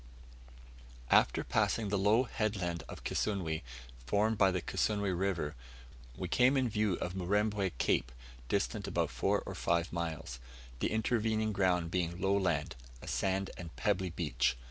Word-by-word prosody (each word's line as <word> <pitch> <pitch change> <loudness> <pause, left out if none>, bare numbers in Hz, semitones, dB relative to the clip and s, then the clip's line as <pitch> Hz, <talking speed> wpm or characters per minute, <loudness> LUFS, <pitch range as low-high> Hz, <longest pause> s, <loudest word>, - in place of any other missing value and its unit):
After - - +4
passing 110 -3 +1
the 100 - +1
low 105 +5 +4
headland 100 -8 -2
of - - -9
Kisunwe, 90 -7 -1 0.5
formed 110 +2 +2
by 95 - +6
the 90 -1 0
Kisunwe 100 +2 0
River, 90 -5 -1 0.6
we - - -3
came 130 +3 +4
in 130 -2 +2
view 105 -3 +1
of 90 - -4
Murembwe 100 +1 0
Cape, 65 - +1 0.4
distant - - -1
about - - 0
four - - +1
or - - -5
five 85 +1 0
miles: 80 -6 -4 0.4
the - - +1
intervening 110 -1 +1
ground 90 -4 +1
being 85 -1 -1
low 100 +1 +2
land, 90 -7 0 0.2
a - - -11
sandy 95 0 0
and 85 -2 -8
pebbly 95 -3 0
beach. 80 -7 0
95 Hz, 145 wpm, -33 LUFS, 85-105 Hz, 0.6 s, by